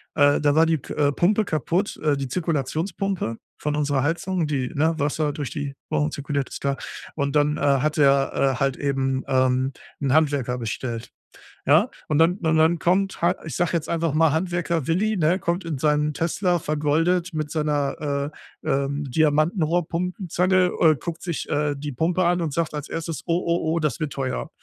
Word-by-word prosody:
Äh, 145 -1 +4
da 145 0 +2
war 160 - +6
die 165 -1 +2
k 135 - -8
äh, 145 -1 +2
Pumpe 205 +8 +2
kaputt, 170 +4 -1
äh 150 -2 +2
die 135 -2 -4
Zirkulationspumpe 165 - -2 0.2
von 150 0 -2
unserer 145 -2 +1
Heizung, 170 +2 -1
die, 130 -4 -1
ne, 160 +3 +1
Wasser 150 0 0
durch 145 -4 -4
die 140 -1 -4 0.2
Rohre 150 +1 +1
zirkuliert- 140 -1 -2
ist - - -8
klar. 140 0 0 0.4
Und 140 -1 -1
dann, 150 0 +3
äh, - - -6
hat 145 +2 +2
er, 140 -1 +4
äh, 135 -2 +2
halt 135 -1 +1
eben, 135 -2 -1
ähm, 130 0 +2 0.3
'n 140 -2 0
Handwerker 140 -5 +2
bestellt, 115 0 -4 0.5
ja? - - +5 0.2
Und 150 - +1
dann 170 +4 +4
und 160 -3 +1
dann 160 +1 +3
kommt, 190 +3 +1
halt, 175 +2 +3
ich 155 - -5
sage 175 -2 +1
jetzt 165 -2 -1
einfach 165 -2 0
mal 160 -1 +4
Handwerker 170 -2 -1
Willi, 205 +5 +1
ne, 170 +3 +2
kommt 175 +1 -2
in 160 -4 -3
seinem 150 +2 +1
Tesla 175 +3 0
vergoldet 165 +4 0
mit 155 -1 -3
seiner, 145 -1 -1 0.3
äh, - - -3
ähm, 140 +1 0
Diamantenrohrpumpenzange, 175 +4 +1
äh, 160 -2 +5
guckt 170 -1 -5
sich, 170 -4 -4
äh, 145 0 0
die 145 +1 -5
Pumpe 170 +7 +1
an 175 +1 +2
und 155 -4 -2
sagt 165 0 -1
als 150 -1 -5
Erstes: 165 -3 -4
„Oh, 170 -1 +1
oh, 170 -1 0
oh, 170 - +1
das 150 +1 -1
wird 150 -3 -3
teuer.“ 135 +2 -3
155 Hz, 190 wpm, -24 LUFS, 140-170 Hz, 0.5 s, war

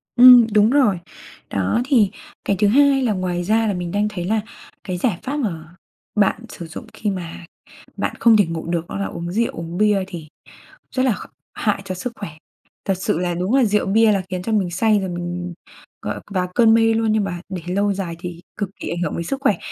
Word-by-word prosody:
Ừm, 245 -2 +9
đúng 210 +1 +5
rồi. 245 -9 +3 0.5
Đó, 100 - 0
thì 230 -8 +3 0.3
cái 200 - +1
thứ 210 - +4
hai 275 +3 +4
là 225 - +2
ngoài 180 -2 -2
ra 220 +3 +2
là 205 - +1
mình 175 -1 -4
đang 205 +1 +1
thấy 180 -5 -5
là 215 +3 +1 0.4
cái 180 -2 -3
giải 185 -3 0
pháp 280 +3 -3
mà 170 - -4 0.4
bạn 210 +2 +2
sử 170 - -8
dụng 160 - -8
khi 210 - -2
mà 175 -3 -6 0.5
bạn - - -2
không 230 -2 +6
thể 205 - +4
ngủ 165 -1 -5
được 170 -1 -2
đó - - -4
là 200 - -1
uống 170 +1 -5
rượu 230 +4 +1
uống 165 +1 -6
bia 210 -2 +3
thì 170 -5 -8 0.7
rất 260 - +2
là 255 - +3
kh - - -10 0.2
hại 205 -2 -1
cho 185 - -4
sức 235 +7 -5
khỏe. 200 -6 -6 0.6
Thật 195 - +2
sự 175 - -1
là 175 -1 -1
đúng 185 +8 0
là 265 - +5
rượu 210 -2 +1
bia 220 +2 +4
là 195 - +1
khiến 185 -1 -3
cho 225 - -3
mình 200 -5 +1
say 210 +4 +2
rồi 190 - -3
mình 175 0 -4 0.5
gọi - - -4
vào 180 -2 0
cơn 230 -2 +6
mê 225 0 +4
luôn, 225 -1 +1
nhưng 215 -1 +2
mà 175 -3 -4
để 185 -3 -5
lâu 200 0 +2
dài 185 -4 -4
thì 175 -1 -7 0.2
cực 205 -3 -2
kỳ - - -5
ảnh 170 - -3
hưởng - - -2
đến 170 - -2
sức 275 +10 -4
khỏe, 210 -8 +2
200 Hz, 230 wpm, -21 LUFS, 175-225 Hz, 0.7 s, Ừm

